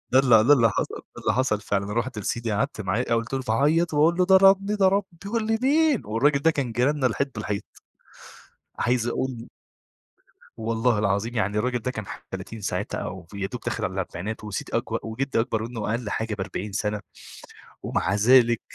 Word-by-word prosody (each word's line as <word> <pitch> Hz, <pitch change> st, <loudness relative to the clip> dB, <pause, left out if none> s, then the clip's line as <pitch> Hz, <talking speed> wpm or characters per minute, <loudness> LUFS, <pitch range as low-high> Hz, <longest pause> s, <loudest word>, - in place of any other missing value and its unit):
ده 130 Hz, -, +6 dB
ال 135 Hz, -1 st, +3 dB, 0.2 s
ده 145 Hz, -, +7 dB
اللي 115 Hz, -5 st, +4 dB
حصَل، -, -, -2 dB, 0.2 s
ده -, -, -9 dB
اللي -, -, +1 dB
حصَل 120 Hz, -5 st, +1 dB
فعلًا. 100 Hz, 0 st, -2 dB
رُحت 120 Hz, 0 st, -2 dB
لسيدي، 115 Hz, +2 st, -2 dB
قعَدت 105 Hz, +1 st, -1 dB
معاه، 95 Hz, +3 st, -1 dB
آآ، -, -, +4 dB
وفضلت 125 Hz, +2 st, -2 dB
أعيّط، 155 Hz, +8 st, +2 dB
وأقول 160 Hz, +4 st, +4 dB
له: 180 Hz, -, +4 dB
"ضربني، 195 Hz, +2 st, +5 dB
ضربني" 195 Hz, -2 st, +1 dB
يقول 220 Hz, +1 st, -2 dB
لي: 225 Hz, 0 st, +1 dB
"مين؟" 295 Hz, -1 st, +3 dB
والراجل 140 Hz, +7 st, +2 dB
ده 165 Hz, -, +5 dB
كان 140 Hz, -6 st, -2 dB
جيراننا 130 Hz, +3 st, +1 dB
الحيط 135 Hz, +3 st, -1 dB
بالحيط. 105 Hz, -1 st, -3 dB, 1.1 s
عايز 120 Hz, -1 st, +1 dB
أقول 130 Hz, +2 st, -1 dB
لِك 115 Hz, -1 st, -9 dB, 1.1 s
والله 115 Hz, 0 st, 0 dB
العظيم، 105 Hz, +3 st, 0 dB
يعني 105 Hz, -1 st, 0 dB
الراجل 125 Hz, +3 st, 0 dB
ده 125 Hz, +2 st, -3 dB
كان 110 Hz, -5 st, -6 dB
ح -, -, -9 dB
30 115 Hz, -1 st, -7 dB
ساعتها -, -, -3 dB
أو 90 Hz, -2 st, -6 dB
يادوب 100 Hz, +4 st, -4 dB
داخل 120 Hz, -2 st, -3 dB
على 95 Hz, -, -2 dB
الأربعينات 95 Hz, +3 st, -5 dB
وسيدي 105 Hz, -3 st, -5 dB
أكبر -, -, -2 dB
وجدّي 115 Hz, +3 st, -1 dB
أكبر 115 Hz, -2 st, -1 dB
منه 115 Hz, -3 st, -4 dB
أقل 115 Hz, -1 st, -2 dB
حاجة 110 Hz, 0 st, -2 dB
ب40 100 Hz, 0 st, -5 dB
سَنة، 105 Hz, 0 st, -2 dB, 0.8 s
ومع 95 Hz, -, -1 dB
ذلك، 120 Hz, +2 st, +5 dB
120 Hz, 180 wpm, -25 LUFS, 105-140 Hz, 1.1 s, ده